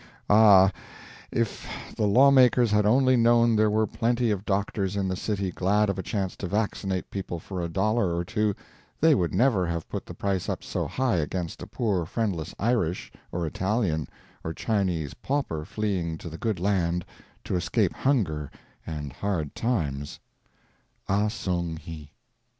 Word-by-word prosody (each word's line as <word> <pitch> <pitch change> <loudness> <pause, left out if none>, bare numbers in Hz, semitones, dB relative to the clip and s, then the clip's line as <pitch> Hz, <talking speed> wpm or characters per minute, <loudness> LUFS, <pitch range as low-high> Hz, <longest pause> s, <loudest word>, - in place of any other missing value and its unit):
Ah, 100 -3 +7 0.6
if 115 -3 -2 0.3
the 105 - +1
law 130 +7 +6
makers 125 -3 +5
had 105 0 +3
only 130 +3 +4
known 115 -1 +4
there 110 0 +4
were 110 +1 +2
plenty 115 +2 0
of 100 0 -2
doctors 100 -1 -1
in 100 -1 0
the 95 - -1
city 100 -1 -2
glad 100 +3 +2
of 100 - -5
a - - 0
chance 95 -1 -3
to 95 - -4
vaccinate 95 -2 -2
people 95 -3 -4
for 90 +2 -6
a 85 - -3
dollar 95 0 +1
or 85 +1 -2
two, 105 +1 0 0.4
they 160 0 +5
would 90 - +1
never 100 -3 +2
have 85 -1 -3
put - - -5
the - - -8
price 95 -2 -1
up - - -3
so - - -2
high 130 -7 0
against 85 +2 -3
a - - -7
poor 100 -8 -1
friendless 95 -6 -2
Irish, 105 -7 0 0.2
or 85 -1 -2
Italian, 95 - -1 0.4
or 80 - -4
Chinese 90 - -1
pauper 130 - -2
fleeing 90 -7 -2
to 85 - -8
the 80 - -8
good 110 -6 -1
land 90 -3 0 0.4
to - - -2
escape 90 - +1
hunger 85 - 0 0.4
and 75 -4 -5
hard 85 -8 -2
times. 75 - -2 0.9
AH 100 +2 +2
SONG 90 -6 -2
HI. 80 -2 -9
100 Hz, 165 wpm, -26 LUFS, 85-110 Hz, 0.9 s, Ah